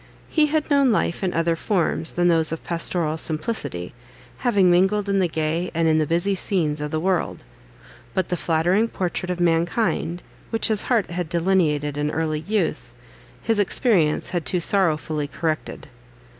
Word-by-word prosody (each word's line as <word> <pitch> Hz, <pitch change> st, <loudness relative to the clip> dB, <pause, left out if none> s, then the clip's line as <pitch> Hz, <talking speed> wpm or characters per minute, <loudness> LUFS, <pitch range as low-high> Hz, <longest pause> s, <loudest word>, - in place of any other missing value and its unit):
He 310 Hz, -2 st, +3 dB
had 305 Hz, 0 st, -1 dB
known 280 Hz, -3 st, +4 dB
life 195 Hz, -3 st, 0 dB
in 185 Hz, -, +1 dB
other 165 Hz, 0 st, +1 dB
forms 170 Hz, -3 st, 0 dB
than 175 Hz, 0 st, +2 dB
those 165 Hz, -2 st, +2 dB
of 165 Hz, -, -5 dB
pastoral 165 Hz, -2 st, -1 dB
simplicity, 155 Hz, -, -3 dB, 0.5 s
having 205 Hz, -8 st, +3 dB
mingled 195 Hz, +3 st, +2 dB
in 200 Hz, 0 st, +1 dB
the 185 Hz, -, +2 dB
gay 160 Hz, +2 st, -2 dB
and 165 Hz, 0 st, +2 dB
in 155 Hz, 0 st, +3 dB
the 155 Hz, -, 0 dB
busy 175 Hz, +5 st, +2 dB
scenes 165 Hz, -6 st, -1 dB
of 150 Hz, -, -3 dB
the 155 Hz, -, -2 dB
world; 185 Hz, +1 st, -1 dB, 0.7 s
but 185 Hz, -2 st, 0 dB
the 180 Hz, -, 0 dB
flattering 175 Hz, +7 st, +1 dB
portrait 180 Hz, -3 st, -3 dB
of 180 Hz, -1 st, -2 dB
mankind, 175 Hz, +1 st, 0 dB, 0.3 s
which 225 Hz, 0 st, +1 dB
his 215 Hz, -2 st, +1 dB
heart 230 Hz, -8 st, +1 dB
had 175 Hz, -2 st, -3 dB
delineated 165 Hz, -5 st, +1 dB
in 150 Hz, 0 st, 0 dB
early 155 Hz, 0 st, -1 dB
youth, 205 Hz, +7 st, -2 dB, 0.5 s
his 225 Hz, -2 st, +1 dB
experience 190 Hz, -, +2 dB
had 175 Hz, -3 st, -1 dB
too 165 Hz, +6 st, +1 dB
sorrowfully 155 Hz, -5 st, 0 dB
corrected. 155 Hz, +1 st, -4 dB
175 Hz, 165 wpm, -23 LUFS, 160-195 Hz, 0.7 s, known